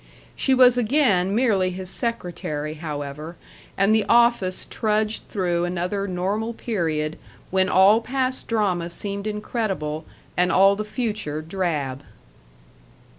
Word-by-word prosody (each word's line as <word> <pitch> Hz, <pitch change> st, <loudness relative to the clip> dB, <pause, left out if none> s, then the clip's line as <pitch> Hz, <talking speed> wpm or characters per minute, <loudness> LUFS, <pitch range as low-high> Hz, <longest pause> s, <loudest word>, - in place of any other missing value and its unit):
She 265 Hz, -, +2 dB
was 250 Hz, -1 st, +6 dB
again 215 Hz, -7 st, +2 dB
merely 210 Hz, -7 st, +2 dB
his 185 Hz, +1 st, -6 dB
secretary, 175 Hz, -, -3 dB
however, 150 Hz, 0 st, -6 dB, 0.4 s
and 195 Hz, +2 st, +4 dB
the 220 Hz, -1 st, +3 dB
office 235 Hz, -6 st, +3 dB
trudged 215 Hz, 0 st, -1 dB
through 175 Hz, -4 st, -1 dB
another 180 Hz, +3 st, -2 dB
normal 200 Hz, +5 st, -2 dB
period 160 Hz, -9 st, -2 dB, 0.3 s
when 190 Hz, 0 st, +2 dB
all 200 Hz, +4 st, +6 dB
past 260 Hz, +1 st, -1 dB
drama 190 Hz, -7 st, 0 dB
seemed 200 Hz, +3 st, -4 dB
incredible 200 Hz, -8 st, -3 dB, 0.3 s
and 180 Hz, +1 st, +3 dB
all 195 Hz, +1 st, +5 dB
the 215 Hz, -, -3 dB
future 210 Hz, -, -3 dB
drab. 155 Hz, -7 st, -2 dB
195 Hz, 120 wpm, -23 LUFS, 175-220 Hz, 0.4 s, was